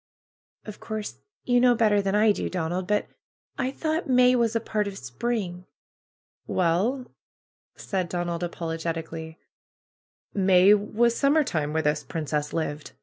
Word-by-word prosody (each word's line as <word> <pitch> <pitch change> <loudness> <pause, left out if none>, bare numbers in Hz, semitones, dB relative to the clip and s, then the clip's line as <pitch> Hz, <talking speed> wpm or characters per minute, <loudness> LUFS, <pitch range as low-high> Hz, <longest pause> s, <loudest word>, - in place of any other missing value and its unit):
"Of 210 -1 -9
course 215 -1 -6 0.2
you 245 -1 +3
know 245 0 +5
better 210 -3 +3
than 195 0 -1
I 215 +1 +5
do, - - -2
Donald, 180 +1 -2
but 210 +1 +1 0.5
I 260 - 0
thought 315 +3 -2
May 250 0 +5
was 235 -2 +1
a - - +3
part 215 -2 -2
of 195 -1 -6
spring." 180 - -4 0.8
"Well," 195 +10 +1 0.7
said 185 -3 -3
Donald, 175 -1 -3
apologetically, 165 -1 -4 1.0
"May 190 0 +5
was 220 +3 +1
sum 275 +2 +3
mer 315 -1 +4
time 155 - -2
where 160 +1 0
this 150 +1 0
princess 150 -2 -3
lived. 155 -2 -4
195 Hz, 145 wpm, -26 LUFS, 165-230 Hz, 1.0 s, know